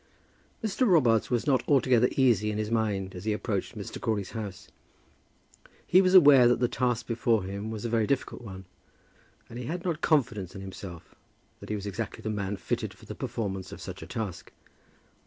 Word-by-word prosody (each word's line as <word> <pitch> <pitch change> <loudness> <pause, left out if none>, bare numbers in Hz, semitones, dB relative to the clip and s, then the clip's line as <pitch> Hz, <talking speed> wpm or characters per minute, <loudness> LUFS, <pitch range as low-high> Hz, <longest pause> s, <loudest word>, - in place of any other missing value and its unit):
Mr. 220 +4 +1
Robarts 125 - +4
was 120 -2 0
not 135 -3 +3
altogether 125 -3 +4
easy 115 -6 +3
in 105 - -2
his 110 0 -2
mind 100 -4 -1
as 90 - -8
he 110 - +1
approached 105 -2 -3
Mr. - - -7
Crawley's 105 -4 -1
house. 105 -3 -6 1.2
He 185 - +5
was 185 0 +3
aware 140 -8 +8
that 120 - +3
the 125 - +3
task 125 -1 -1
before 115 -2 +1
him 100 +3 -5
was 110 0 -5
a - - -1
very 115 -2 +1
difficult 140 -2 -1
one, 95 -4 -9 0.8
and 120 - -8
he 125 - -5
had 175 +7 -4
not 170 -4 -1
confidence 115 - +1
in 95 - -7
himself, 95 -3 -9 0.5
that - - -11
he 105 - -1
was 100 -1 -5
exactly 105 +1 -5
the 110 - -2
man 100 -1 -3
fitted - - -3
for - - -16
the - - -7
performance 95 -4 -4
of - - -8
such - - -8
a - - -8
task. 105 -6 -5
110 Hz, 195 wpm, -28 LUFS, 100-125 Hz, 1.2 s, aware